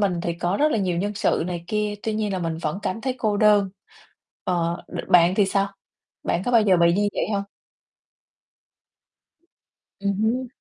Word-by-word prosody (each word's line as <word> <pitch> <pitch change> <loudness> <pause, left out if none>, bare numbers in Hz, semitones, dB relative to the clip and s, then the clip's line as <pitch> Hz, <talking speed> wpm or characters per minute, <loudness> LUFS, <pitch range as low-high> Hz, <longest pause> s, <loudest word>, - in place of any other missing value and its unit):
mình 185 -4 +1
thì 170 - -2
có 175 +3 -1
rất 300 +1 +2
là - - +1
nhiều 185 -4 0
nhân 205 +2 -2
sự 180 - +1
này 175 -2 -4
kia, 210 +2 -1
tuy 220 -1 -2
nhiên 210 -2 -1
là 190 - -1
mình 165 -2 -2
vẫn 160 +2 -3
cảm 205 +5 -2
thấy 260 +1 -2
cô 215 -3 0
đơn. 205 -2 +4 0.7
Ờ, 170 -1 -1
đ - - -7
bạn 175 +1 +5
thì 200 -1 +3
sao? 195 +1 +1 0.5
Bạn 180 - -1
có - - 0
bao 230 - +6
giờ 190 -3 +4
bị 170 0 +4
như 205 +1 +2
vậy - - -1
hông? 200 0 -1 2.6
Ừm 200 0 0
hứm. 250 +4 0
200 Hz, 190 wpm, -23 LUFS, 175-210 Hz, 2.6 s, bao